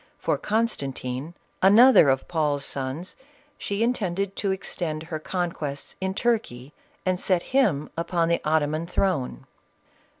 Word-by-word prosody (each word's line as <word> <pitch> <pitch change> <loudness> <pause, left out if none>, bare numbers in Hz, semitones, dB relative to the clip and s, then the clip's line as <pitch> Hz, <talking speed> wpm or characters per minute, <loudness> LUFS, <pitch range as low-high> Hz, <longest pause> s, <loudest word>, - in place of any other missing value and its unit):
For - - -1
Constantine, 145 - -2 0.3
another 210 - +7
of 135 0 +1
Paul's 150 -4 0
sons, 135 +6 -4 0.4
she 200 +2 -1
intended 200 -5 -1
to 200 - -1
extend 170 -4 -3
her 160 -1 -5
conquests 155 -5 -4
in 190 0 -2
Turkey, 175 - -1 0.3
and 185 0 0
seat 180 -3 +2
him 195 - +2
upon 170 0 0
the 170 0 +1
Ottoman 155 +1 0
throne. 150 - -1
170 Hz, 125 wpm, -25 LUFS, 145-195 Hz, 0.4 s, another